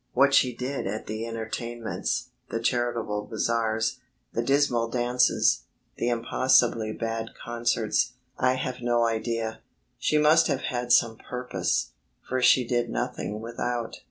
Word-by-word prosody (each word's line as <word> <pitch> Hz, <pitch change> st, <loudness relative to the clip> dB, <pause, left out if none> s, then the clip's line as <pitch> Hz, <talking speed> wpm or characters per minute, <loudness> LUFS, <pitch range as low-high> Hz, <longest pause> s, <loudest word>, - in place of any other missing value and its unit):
What 140 Hz, +2 st, +4 dB
she 125 Hz, -3 st, +4 dB
did 130 Hz, -1 st, -3 dB
at 110 Hz, +3 st, -4 dB
the 110 Hz, +2 st, -4 dB
entertainments, 115 Hz, +1 st, -3 dB, 0.2 s
the 115 Hz, -, -2 dB
charitable 115 Hz, -3 st, -1 dB
bazaars, 110 Hz, +1 st, 0 dB, 0.3 s
the 115 Hz, -, 0 dB
dismal 125 Hz, -3 st, +2 dB
dances, 120 Hz, -, +2 dB, 0.3 s
the 120 Hz, -, 0 dB
impossibly 120 Hz, -1 st, +2 dB
bad 115 Hz, 0 st, -4 dB
concerts, 120 Hz, 0 st, 0 dB, 0.2 s
I 130 Hz, 0 st, +2 dB
have 130 Hz, -1 st, -4 dB
no 120 Hz, -1 st, +2 dB
idea. 115 Hz, 0 st, -2 dB, 0.4 s
She 155 Hz, -, +2 dB
must 155 Hz, +2 st, +5 dB
have -, -, 0 dB
had 120 Hz, -2 st, -2 dB
some 115 Hz, -2 st, +4 dB
purpose, 125 Hz, +1 st, -2 dB, 0.4 s
for 130 Hz, 0 st, -1 dB
she 125 Hz, 0 st, +5 dB
did 120 Hz, -1 st, 0 dB
nothing 120 Hz, -4 st, -3 dB
without. 120 Hz, 0 st, -3 dB
120 Hz, 130 wpm, -26 LUFS, 115-125 Hz, 0.4 s, must